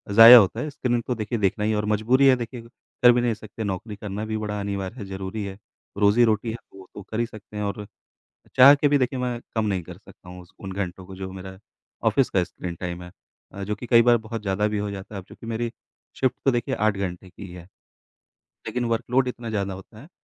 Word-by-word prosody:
जाया 115 Hz, +2 st, +12 dB
होता 100 Hz, -5 st, +3 dB
है। 150 Hz, -, -3 dB
स्क्रीन 125 Hz, -4 st, -1 dB
तो 125 Hz, -, 0 dB
देखिए 110 Hz, +2 st, -3 dB
देखना 100 Hz, +2 st, 0 dB
ही 110 Hz, -, +1 dB
है 105 Hz, -, 0 dB
और 105 Hz, -, -1 dB
मजबूरी 115 Hz, +6 st, +3 dB
है 130 Hz, -, +7 dB
देखिए, 120 Hz, 0 st, -6 dB
कर 120 Hz, +1 st, +1 dB
भी 120 Hz, 0 st, +2 dB
नहीं 120 Hz, -2 st, +1 dB
सकते। 110 Hz, +1 st, -8 dB
नौकरी 100 Hz, +2 st, -4 dB
करना 105 Hz, +1 st, -5 dB
भी 110 Hz, 0 st, -3 dB, 0.2 s
अनिवार्य 100 Hz, +1 st, -4 dB
है, 105 Hz, -, -6 dB
ज़रूरी 95 Hz, +2 st, -5 dB
है। 95 Hz, -1 st, -6 dB, 0.4 s
रोजी-रोटी 110 Hz, +2 st, +3 dB
है 115 Hz, -, -5 dB, 0.2 s
वो 95 Hz, -1 st, -13 dB
तो -, -, -7 dB
कर 110 Hz, -, -3 dB
ही 120 Hz, -, +2 dB
सकते 110 Hz, -2 st, -12 dB
हैं 105 Hz, -, -2 dB
और 105 Hz, +1 st, -4 dB, 0.7 s
चाह 135 Hz, +3 st, +10 dB
के 145 Hz, +1 st, +2 dB
भी 145 Hz, 0 st, +3 dB
देखिए 130 Hz, 0 st, -1 dB
मैं 125 Hz, -2 st, -2 dB, 0.2 s
कम 110 Hz, -, +1 dB
नहीं 95 Hz, -3 st, -1 dB
कर -, -, -11 dB
सकता 90 Hz, -, -18 dB
हूँ, 90 Hz, 0 st, -10 dB
उस 90 Hz, -, -20 dB
उन 95 Hz, -1 st, -6 dB
घंटों 95 Hz, -1 st, -5 dB
को 95 Hz, -, -10 dB
जो 95 Hz, 0 st, -6 dB
मेरा 95 Hz, 0 st, -9 dB, 0.5 s
ऑफ़िस -, -, +1 dB
का -, -, +2 dB
स्क्रीन 85 Hz, -1 st, -7 dB
टाइम 90 Hz, -1 st, -5 dB
है। 90 Hz, -, -10 dB, 0.4 s
अ, 100 Hz, +1 st, -7 dB
जो 105 Hz, +1 st, -2 dB
कि 120 Hz, +4 st, -9 dB
कई 115 Hz, 0 st, +6 dB
बार 120 Hz, 0 st, +5 dB
बहुत 115 Hz, -1 st, -6 dB
ज़्यादा 100 Hz, +1 st, 0 dB
भी 105 Hz, -, -2 dB
हो 105 Hz, 0 st, -2 dB
जाता 100 Hz, +1 st, -8 dB
है। 95 Hz, -, -4 dB
अब 90 Hz, -, -19 dB
चूँकि 115 Hz, -, -12 dB
मेरी 115 Hz, +1 st, -2 dB, 0.5 s
शिफ्ट 130 Hz, -1 st, +2 dB
तो 135 Hz, -, +5 dB
देखिए 120 Hz, -2 st, -1 dB
8 105 Hz, -1 st, +1 dB
घंटे 95 Hz, -1 st, -5 dB
की 95 Hz, -, -10 dB
ही 90 Hz, -, -12 dB
है। 90 Hz, -1 st, -11 dB, 1.0 s
लेकिन 125 Hz, -1 st, -2 dB
वर्क़ 115 Hz, -1 st, -1 dB
लोड 130 Hz, +1 st, +3 dB
इतना 120 Hz, -2 st, -6 dB
ज़्यादा 100 Hz, -3 st, -2 dB
होता 100 Hz, +3 st, -13 dB
है। 145 Hz, -, -14 dB
105 Hz, 245 wpm, -24 LUFS, 95-120 Hz, 1.0 s, जाया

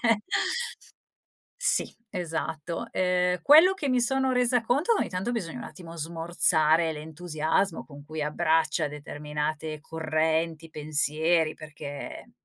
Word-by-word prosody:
Cioè 230 Hz, -3 st, +3 dB, 1.4 s
Sì -, -, +2 dB, 0.2 s
esatto, 165 Hz, -2 st, -3 dB
ehm, 180 Hz, -1 st, +1 dB
quello 325 Hz, +6 st, +8 dB
che 295 Hz, -7 st, -3 dB
mi 255 Hz, -1 st, +3 dB
sono 265 Hz, +2 st, +2 dB
resa 250 Hz, -1 st, +3 dB
conto, 280 Hz, -, +2 dB
che -, -, 0 dB
ogni -, -, -1 dB
tanto 190 Hz, +6 st, -2 dB
bisogna 170 Hz, -, -3 dB
un -, -, -7 dB
attimo 170 Hz, -2 st, -10 dB
smorzare 165 Hz, 0 st, +2 dB
l'entusiasmo 160 Hz, +3 st, -1 dB
con 145 Hz, -1 st, -13 dB
cui 155 Hz, 0 st, -5 dB
abbraccia 160 Hz, +1 st, +1 dB
determinate 150 Hz, +1 st, -4 dB
correnti, 160 Hz, 0 st, -1 dB
pensieri, 155 Hz, +2 st, +1 dB
perché 150 Hz, -2 st, -8 dB
160 Hz, 120 wpm, -27 LUFS, 155-185 Hz, 1.4 s, quello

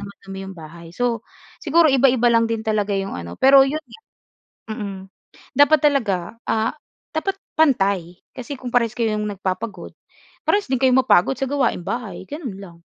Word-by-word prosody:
ng 200 Hz, -, -7 dB
madumi 195 Hz, -1 st, -10 dB
yung 190 Hz, -, -10 dB
bahay. 165 Hz, +1 st, -11 dB
So, 240 Hz, -3 st, 0 dB, 0.4 s
siguro 330 Hz, +1 st, +4 dB
iba-iba 255 Hz, -2 st, +4 dB
lang 230 Hz, 0 st, +4 dB
din 225 Hz, -1 st, -2 dB
talaga 210 Hz, -2 st, 0 dB
yung 195 Hz, 0 st, -3 dB
ano, 85 Hz, 0 st, -7 dB
pero 270 Hz, +1 st, +7 dB
'yon 310 Hz, +3 st, -3 dB
nga, 285 Hz, -, -15 dB, 0.7 s
mm, 200 Hz, -4 st, -6 dB, 0.5 s
dapat 290 Hz, +2 st, +6 dB
talaga, 270 Hz, -10 st, +3 dB, 0.3 s
ah, 220 Hz, +1 st, +1 dB, 0.4 s
dapat 390 Hz, +5 st, -1 dB, 0.2 s
pantay. 195 Hz, -, +2 dB, 0.2 s
Kasi 255 Hz, +3 st, -6 dB
kung 255 Hz, -1 st, -7 dB
parehas 235 Hz, -2 st, +2 dB
kayong 215 Hz, -3 st, 0 dB
nagpapagod, 190 Hz, +4 st, -4 dB, 0.5 s
parehas 410 Hz, 0 st, +2 dB
din 260 Hz, -, +1 dB
kayo 260 Hz, -, +4 dB
mapagod 250 Hz, -2 st, +3 dB
sa 270 Hz, -, -1 dB
gawaing 255 Hz, -10 st, 0 dB
bahay, 235 Hz, -6 st, -4 dB
ganun 280 Hz, -, -6 dB
lang. 175 Hz, -4 st, -12 dB
230 Hz, 160 wpm, -21 LUFS, 195-270 Hz, 0.7 s, pero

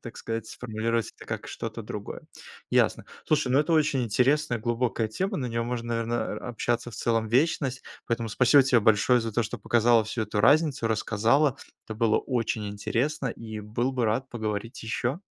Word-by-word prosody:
так 120 Hz, -, -9 dB
сказать, 115 Hz, 0 st, -4 dB
сформулировать 115 Hz, -1 st, -2 dB
это -, -, -12 dB
как -, -, -5 dB
что-то -, -, -6 dB
другое. -, -, -7 dB, 0.5 s
Ясно.Слушай, 150 Hz, -5 st, 0 dB
ну 140 Hz, -, +5 dB
это 160 Hz, +2 st, 0 dB
очень 150 Hz, -4 st, +2 dB
интересная 125 Hz, +3 st, +2 dB
глубокая 120 Hz, 0 st, 0 dB
тема, 190 Hz, -, -2 dB
на 125 Hz, -, -2 dB
неё 115 Hz, 0 st, -2 dB
можно, 120 Hz, 0 st, -4 dB
наверно 115 Hz, +1 st, -1 dB
а -, -, -8 dB
общаться 120 Hz, 0 st, -2 dB
в 110 Hz, -, -10 dB
целом 115 Hz, -1 st, 0 dB
вечность, 130 Hz, +1 st, +1 dB, 0.2 s
поэтому 115 Hz, -1 st, -1 dB
спасибо 125 Hz, +5 st, +5 dB
тебе 125 Hz, -3 st, +4 dB
большое 110 Hz, +3 st, +4 dB
за 115 Hz, -, -3 dB
то, 120 Hz, 0 st, +1 dB
что 105 Hz, -, -5 dB
показала 120 Hz, -1 st, +3 dB
всю 110 Hz, +1 st, -3 dB
эту 105 Hz, -1 st, -2 dB
разницу, 145 Hz, 0 st, +3 dB
рассказала. 115 Hz, +6 st, +2 dB, 0.3 s
Это 110 Hz, -, -5 dB
было 110 Hz, -1 st, +2 dB
очень 115 Hz, -4 st, -2 dB
интересно 130 Hz, +8 st, -2 dB
и 110 Hz, -2 st, -7 dB
был 115 Hz, +5 st, -2 dB
бы 125 Hz, -2 st, 0 dB
рад 130 Hz, +5 st, -1 dB
поговорить 110 Hz, +1 st, -4 dB
ещё. 120 Hz, -, -2 dB
120 Hz, 175 wpm, -27 LUFS, 110-130 Hz, 0.5 s, ну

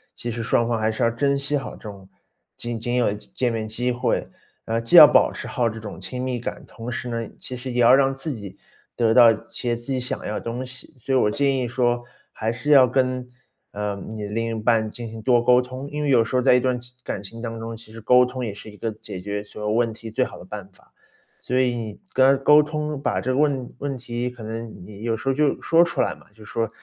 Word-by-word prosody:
其 120 Hz, -, -5 dB
实 115 Hz, 0 st, -3 dB
双 115 Hz, 0 st, +2 dB
方 115 Hz, -1 st, 0 dB
还 110 Hz, 0 st, +1 dB
是 110 Hz, -, -2 dB
要 115 Hz, -, +4 dB
珍 140 Hz, +4 st, +1 dB
惜 140 Hz, +1 st, 0 dB
好 135 Hz, -, -5 dB
这 -, -, -17 dB
种 100 Hz, -2 st, -12 dB, 0.5 s
仅 120 Hz, -1 st, -4 dB
仅 120 Hz, +2 st, -2 dB
有 120 Hz, -4 st, +2 dB
见 120 Hz, +4 st, -3 dB
面 110 Hz, -1 st, -3 dB
机 120 Hz, +3 st, -1 dB
会， 125 Hz, +1 st, -1 dB, 0.4 s
呃， 115 Hz, +1 st, 0 dB
既 115 Hz, 0 st, 0 dB
要 -, -, +13 dB
保 -, -, +4 dB
持 -, -, -7 dB
好 120 Hz, -, 0 dB
这 115 Hz, 0 st, -4 dB
种 105 Hz, -3 st, -8 dB
亲 125 Hz, +7 st, -6 dB
密 130 Hz, -1 st, -2 dB
感， 120 Hz, -, -6 dB
同 115 Hz, +1 st, -7 dB
时 120 Hz, 0 st, -4 dB
呢， 115 Hz, -2 st, -3 dB
其 125 Hz, -, -7 dB
实 125 Hz, +1 st, -6 dB
也 120 Hz, 0 st, +1 dB
要 120 Hz, +2 st, +7 dB
让 135 Hz, 0 st, +4 dB
自 140 Hz, +3 st, -4 dB
己 100 Hz, -6 st, -8 dB, 0.4 s
得 115 Hz, -2 st, +3 dB
到 120 Hz, -2 st, +9 dB
一 110 Hz, -, -1 dB
些 120 Hz, -2 st, -2 dB
自 120 Hz, +3 st, -7 dB
己 130 Hz, -, 0 dB
想 125 Hz, -, -4 dB
要 105 Hz, -, -3 dB
的 -, -, -3 dB
东 120 Hz, +2 st, -4 dB
西。 130 Hz, +4 st, -11 dB
所 135 Hz, -, -3 dB
以 -, -, +5 dB
我 105 Hz, -, +3 dB
建 140 Hz, +1 st, +1 dB
议 125 Hz, -2 st, -1 dB
说， 120 Hz, 0 st, 0 dB, 0.3 s
还 110 Hz, +1 st, -2 dB
是 145 Hz, +5 st, -5 dB
要 135 Hz, -3 st, +8 dB
跟， 130 Hz, 0 st, 0 dB, 0.4 s
呃， 105 Hz, 0 st, -3 dB
你 110 Hz, -1 st, -5 dB
另 115 Hz, +3 st, -2 dB
一 110 Hz, -, -3 dB
半 110 Hz, -1 st, +2 dB
进 115 Hz, 0 st, -7 dB
行 110 Hz, 0 st, -8 dB
多 120 Hz, +1 st, +4 dB
沟 125 Hz, +1 st, +6 dB
通， 130 Hz, +3 st, -7 dB
因 150 Hz, 0 st, -3 dB
为 145 Hz, -, 0 dB
有 120 Hz, -4 st, +5 dB
时 115 Hz, +3 st, -4 dB
候 125 Hz, -, +4 dB
在 125 Hz, -, +5 dB
一 125 Hz, -, +5 dB
段 125 Hz, -1 st, 0 dB
情 125 Hz, +1 st, -16 dB
感 100 Hz, -, -4 dB
情 115 Hz, +3 st, -10 dB
当 115 Hz, -1 st, -5 dB
中， 115 Hz, 0 st, -5 dB
其 110 Hz, -1 st, -15 dB
实 115 Hz, 0 st, -10 dB
沟 125 Hz, +3 st, +5 dB
通 125 Hz, 0 st, -4 dB
也 105 Hz, -, -4 dB
是 105 Hz, -, -11 dB
一 105 Hz, -, -13 dB
个 115 Hz, -, -3 dB
解 105 Hz, -3 st, -9 dB
决 100 Hz, +1 st, -3 dB
所 105 Hz, +1 st, -10 dB
有 105 Hz, 0 st, -1 dB
问 115 Hz, 0 st, +2 dB
题 110 Hz, 0 st, -9 dB
最 -, -, +1 dB
好 -, -, -9 dB
的 90 Hz, -, -12 dB
办 100 Hz, -1 st, -7 dB
法。 90 Hz, -, -25 dB, 0.5 s
所 125 Hz, +1 st, 0 dB
以 125 Hz, -2 st, +2 dB
你 110 Hz, -3 st, -6 dB
跟 130 Hz, -, +5 dB
他 135 Hz, -, -13 dB
沟 150 Hz, +1 st, +7 dB
通， 150 Hz, -1 st, -3 dB
把 -, -, 0 dB
这 130 Hz, -, -1 dB
个 130 Hz, -, 0 dB
问 140 Hz, -4 st, +1 dB
问 140 Hz, -1 st, -3 dB
题， 120 Hz, 0 st, -3 dB
可 120 Hz, -2 st, -11 dB
能 115 Hz, +1 st, -5 dB
你 105 Hz, +1 st, -11 dB
有 115 Hz, -1 st, 0 dB
时 135 Hz, -, -3 dB
候 135 Hz, -, +3 dB
就 150 Hz, +1 st, +1 dB
说 165 Hz, +1 st, +5 dB
出 170 Hz, -, -1 dB
来 -, -, 0 dB
嘛， -, -, -20 dB
就 110 Hz, -, -15 dB
说， 115 Hz, +1 st, -2 dB
120 Hz, 290 characters per minute, -23 LUFS, 110-130 Hz, 0.5 s, 要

